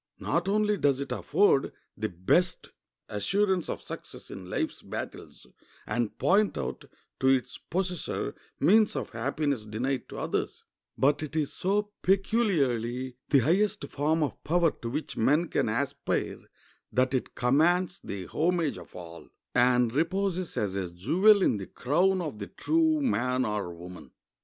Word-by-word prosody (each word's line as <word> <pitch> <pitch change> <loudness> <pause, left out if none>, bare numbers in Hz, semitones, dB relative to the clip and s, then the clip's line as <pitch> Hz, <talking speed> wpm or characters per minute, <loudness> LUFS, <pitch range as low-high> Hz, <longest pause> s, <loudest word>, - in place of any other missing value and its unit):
Not 170 +4 -1
only 210 +1 +2
does 140 -5 +2
it 140 - -4
afford 170 -9 +2 0.2
the 110 +1 -2
best 95 - +1 0.4
assurance 190 - 0
of - - -4
success - - -9
in 95 -1 -8
life's - - -2
battles - - -7 0.4
and 120 -3 -2
point 205 +2 +3
out - - -4 0.3
to 130 - +2
its 130 -2 +2
possessor 180 0 -3 0.3
means 210 +8 +4
of - - -3
happiness 130 +2 -1
denied 120 +5 -3
to - - -8
others, - - -3 0.3
but 145 +2 +3
it 155 0 -6
is 150 -3 0
so 205 +2 0
peculiarly 135 - +1
the 140 -3 +5
highest 195 - +1
form 155 +3 +1
of 145 - -4
power 170 0 +3
to 115 - -7
which 150 +6 -4
men 150 +9 +3
can - - +1
aspire - - -1 0.5
that 130 +1 +2
it 130 - -2
commands 175 +9 +2
the 100 -2 -5
homage 165 - 0
of - - -14
all, 85 -1 -10 0.2
and 125 -1 +3
reposes 185 +4 -1
as 100 -3 0
a 95 -2 -2
jewel 185 - +4
in 110 - +3
the 95 - -6
crown 180 +8 +1
of 150 -11 -5
the 100 - -5
true 320 -1 +1
man 130 - +1
or 105 -4 -2
woman. 90 +1 -10
145 Hz, 150 wpm, -28 LUFS, 120-185 Hz, 0.5 s, the